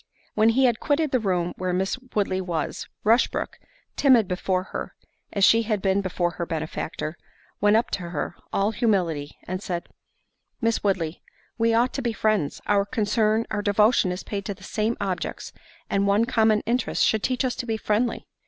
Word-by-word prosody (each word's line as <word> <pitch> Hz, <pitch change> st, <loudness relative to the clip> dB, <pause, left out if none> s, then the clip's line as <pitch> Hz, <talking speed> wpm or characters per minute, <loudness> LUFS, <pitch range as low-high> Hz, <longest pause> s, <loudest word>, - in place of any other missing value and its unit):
When 215 Hz, +1 st, +4 dB
he 260 Hz, +3 st, +4 dB
had 240 Hz, -3 st, +2 dB
quitted 300 Hz, 0 st, +1 dB
the 255 Hz, -, +3 dB
room 180 Hz, -5 st, 0 dB
where 185 Hz, -1 st, -1 dB
Miss 190 Hz, +2 st, 0 dB, 0.2 s
Woodley 195 Hz, -3 st, +1 dB
was, 170 Hz, -4 st, -3 dB, 0.2 s
Rushbrook, 230 Hz, +4 st, +1 dB, 0.4 s
timid 250 Hz, -7 st, +5 dB
before 185 Hz, 0 st, -1 dB
her, -, -, -5 dB, 0.4 s
as 200 Hz, -1 st, +4 dB
she 230 Hz, -, +6 dB
had 215 Hz, -2 st, -1 dB
been 195 Hz, +1 st, +1 dB
before 175 Hz, -2 st, -1 dB
her 170 Hz, +1 st, -4 dB
benefactor, 160 Hz, 0 st, -4 dB, 0.4 s
went 205 Hz, +1 st, +4 dB
up 230 Hz, -, 0 dB
to 175 Hz, -3 st, -3 dB
her, 170 Hz, +1 st, -3 dB, 0.2 s
all 200 Hz, +2 st, +1 dB
humility, 185 Hz, -, 0 dB
and 185 Hz, +1 st, -3 dB
said, 175 Hz, -4 st, -4 dB, 0.7 s
"Miss 230 Hz, -1 st, 0 dB
Woodley, 180 Hz, -5 st, -1 dB, 0.4 s
we 230 Hz, 0 st, +3 dB
ought 240 Hz, +2 st, +2 dB
to 275 Hz, -, -2 dB
be 235 Hz, -3 st, -1 dB
friends: 215 Hz, -10 st, 0 dB
our 200 Hz, -1 st, +3 dB
concern, 215 Hz, +1 st, +1 dB
our 205 Hz, -, -1 dB
devotion 210 Hz, -1 st, +3 dB
is 180 Hz, -, -5 dB
paid 200 Hz, -1 st, -4 dB
to 200 Hz, -, -3 dB
the 185 Hz, -, -17 dB
same 215 Hz, +4 st, -1 dB
objects, 190 Hz, -3 st, -3 dB, 0.3 s
and 200 Hz, 0 st, +1 dB
one 205 Hz, +3 st, +3 dB
common 220 Hz, -3 st, +3 dB
interest 240 Hz, +1 st, +1 dB
should 220 Hz, -, +2 dB
teach 255 Hz, +2 st, 0 dB
us 250 Hz, -, -1 dB
to 245 Hz, -, -4 dB
be 225 Hz, -1 st, 0 dB
friendly." 220 Hz, +3 st, 0 dB
205 Hz, 180 wpm, -25 LUFS, 185-230 Hz, 0.7 s, she